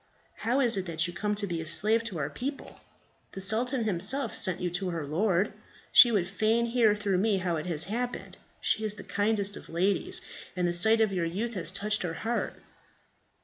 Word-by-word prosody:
How 245 +5 0
is 235 -5 +4
it 190 -1 -3
that 165 -1 0
you 175 - -5
come 210 +4 -2
to 205 0 -2
be 170 -4 -4
a 160 - -8
slave 220 +7 +3
to 200 -7 -5
our 145 -1 -3
people? 270 - -7 0.5
The - - -7
sultan 235 +6 +2
himself 215 +7 +2
sent 185 -4 +3
you 180 -1 -3
to 180 +2 -2
her 165 -4 -4
lord. 185 +5 0 0.4
She 240 - +8
would 195 -6 0
fain 220 +4 0
hear 230 -3 +2
through 200 -3 -1
me 205 0 +1
how 180 -3 -2
it 155 - -5
has 165 -2 +1
happened. 245 +5 -4 0.2
She 220 - 0
is 210 -1 0
the - - -10
kindest 205 -1 0
of - - -12
ladies, 185 +4 +1 0.4
and 180 -1 0
the 175 - -1
sight 220 +6 +4
of 215 -3 +1
your 175 -3 -1
youth 215 +8 -4
has 175 -6 0
touched 210 +3 -1
her 165 -2 -4
heart." 230 +6 -3
200 Hz, 210 wpm, -28 LUFS, 175-225 Hz, 0.5 s, She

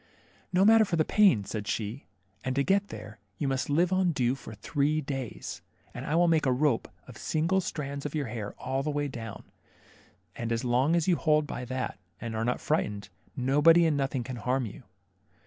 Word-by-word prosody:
No 185 +2 +4
matter 225 +1 +7
for 190 -5 -1
the 155 -2 +2
pain," 195 - +4
said 105 +1 -5
she; 110 +5 -3 0.4
and 130 0 -2
to 140 - +2
get 200 +5 +2
there, 110 - -9 0.2
you 145 - -1
must 135 0 -1
live 170 +5 +2
on 185 -2 +2
dew 125 -2 +1
for 120 -5 -9
three 145 +5 0
days, 135 -6 -5 0.3
and - - -6
I 155 - 0
will 175 +1 +4
make 160 -3 +3
a - - +4
rope 130 -2 +1 0.2
of - - -11
single 165 +5 +1
strands 140 -5 -4
of 150 +1 -4
your 150 -2 0
hair 110 -3 -5
all 135 +1 -2
the 150 - -2
way 145 0 -1
down, 115 -5 -7 0.9
and 115 0 -4
as 115 +1 0
long 130 +6 +2
as 170 0 +1
you 175 -3 +4
hold 155 -1 +3
by 125 - -5
that 130 -4 -4 0.2
and 115 -1 -5
are 110 - -1
not 125 +1 0
frightened, 105 -10 -1 0.3
nobody 150 +6 +5
and 160 -2 +2
nothing 135 -2 -1
can 125 +1 -6
harm 125 +4 0
you. 105 - -8
140 Hz, 205 wpm, -29 LUFS, 120-160 Hz, 0.9 s, matter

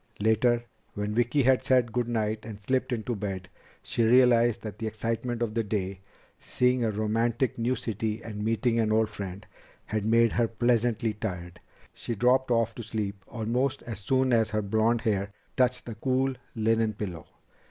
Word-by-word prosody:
Later, 115 +3 +3 0.3
when 105 +1 -2
Vicki 120 +5 +2
had 130 0 +4
said 125 -3 +3
good 120 0 0
night 110 -2 -1
and 110 -2 -8
slipped 130 +5 -1
into 120 0 -2
bed, 95 -2 -5 0.3
she 115 - 0
realized 120 -1 +4
that 105 -1 -7
the 110 - -2
excitement 115 +2 -2
of 110 -2 -2
the 115 0 0
day 100 -3 -3 0.4
seeing 125 0 +1
a 115 - +2
romantic 115 +4 0
new 120 +3 +1
city 110 -1 -3
and 105 -2 -5
meeting 115 +1 +1
an 110 -1 +2
old 110 0 +3
friend 100 -2 -7 0.4
had 110 -1 -2
made 115 +1 +4
her 120 -1 +2
pleasantly 115 -1 +1
tired. 90 -5 -5 0.3
She 115 - -4
dropped 125 +4 +3
off 115 -1 +2
to 120 - -7
sleep 105 -3 -4
almost 120 +5 -1
as 115 -4 -6
soon 130 +4 +1
as 115 -2 +3
her 110 -1 -1
blond 110 +3 +2
hair 100 -2 0 0.2
touched 125 -1 +1
the 115 - -5
cool 130 +4 0 0.2
linen 110 0 +2
pillow. 90 -6 -6
115 Hz, 175 wpm, -28 LUFS, 105-120 Hz, 0.4 s, had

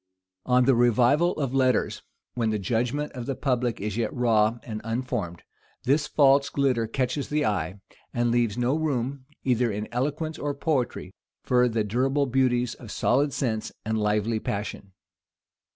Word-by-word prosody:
On 125 0 +4
the 135 - +5
revival 125 +8 +3
of 135 -4 -3
letters, 130 -3 +1 0.3
when 115 -2 0
the 110 - 0
judgment 120 +8 -1
of 125 -2 -7
the 135 - -1
public 125 -4 -1
is 105 +1 -3
yet 115 - 0
raw 115 -4 +2
and 110 -2 -6
unformed, 115 -7 -3 0.4
this 145 +4 +2
false 140 -1 +4
glitter 130 -5 +1
catches 130 +4 -2
the 150 0 +1
eye, 95 -2 -1 0.3
and 120 0 +1
leaves 120 -2 +1
no 125 +3 +1
room, 140 -3 -2 0.2
either 125 -2 +2
in 105 +1 -4
eloquence 150 +6 -2
or 145 -1 -2
poetry, 140 -4 -2 0.3
for 125 -1 +3
the 110 -1 0
durable 135 +7 +1
beauties 125 -2 +1
of 120 - -12
solid 140 +7 +1
sense 110 -5 -2
and 110 +1 -1
lively 105 +1 +1
passion. 100 -2 -5
125 Hz, 155 wpm, -26 LUFS, 110-135 Hz, 0.4 s, the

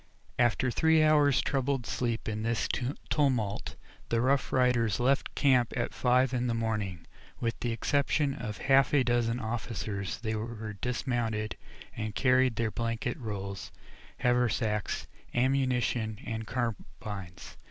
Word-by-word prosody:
After 120 +1 +3
three 160 +5 +4
hours' 150 -3 +4
troubled 135 -2 -1
sleep 115 -2 -2
in 110 0 -2
this 115 +1 0 0.4
tumult 125 -9 0 0.3
the 115 - +2
Rough 135 +3 +2
Riders 120 -4 +2
left 135 +3 +1
camp 130 -4 +3
at 120 - -1
five 125 +1 +2
in 125 0 0
the 115 - 0
morning. 105 -6 -2 0.3
With 115 -1 -2
the 120 - -1
exception 140 +4 +1
of 115 -6 -5
half 135 +4 +4
a 135 - +5
dozen 120 -1 +1
officers 110 -4 -3
they 110 -1 -3
were 110 -1 -4
dismounted, 115 -1 -2 0.4
and 110 -1 -4
carried 130 -2 +3
their 115 -1 0
blanket 115 +2 -2
rolls, 100 -4 -5 0.5
haversacks, 115 -4 +1 0.3
ammunition, 125 -4 +1
and 110 -1 -4
carbines. 105 -6 -5
120 Hz, 130 wpm, -30 LUFS, 110-130 Hz, 0.5 s, a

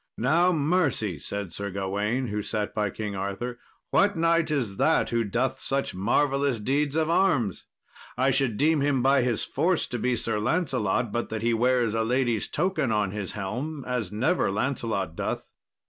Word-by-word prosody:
"Now, 170 +9 +3
mercy," 145 - +1
said 100 +2 -5
Sir 100 +2 -4
Gawain, 105 +6 -1
who 105 +1 -2
sat 105 0 -3
by 105 -1 0
King 105 0 -5
Arthur; 100 +6 -4 0.3
"what 200 0 +3
knight 165 0 +2
is 120 -10 -1
that - - +2
who 115 -1 +1
doth 125 +5 -1
such 135 0 -1
marvellous 135 +7 +1
deeds 140 +6 0
of 160 -1 +2
arms? 160 - +1 0.5
I 135 +1 +3
should 125 -5 +1
deem 155 0 +3
him 140 -3 +1
by 135 0 +4
his 120 -3 0
force 180 0 +1
to 120 - -3
be 125 +2 +1
Sir 115 -2 -1
Lancelot, 120 - 0
but 120 +2 -2
that 110 0 -4
he 120 0 +2
wears 120 -1 +2
a 115 0 +1
lady's 120 -2 0
token 175 -7 0
on 105 -3 +1
his 100 -2 -5
helm 125 +9 -4
as 125 -7 -2
never 130 - +1
Lancelot 105 -5 -2
doth." - - -3
120 Hz, 175 wpm, -26 LUFS, 105-140 Hz, 0.5 s, by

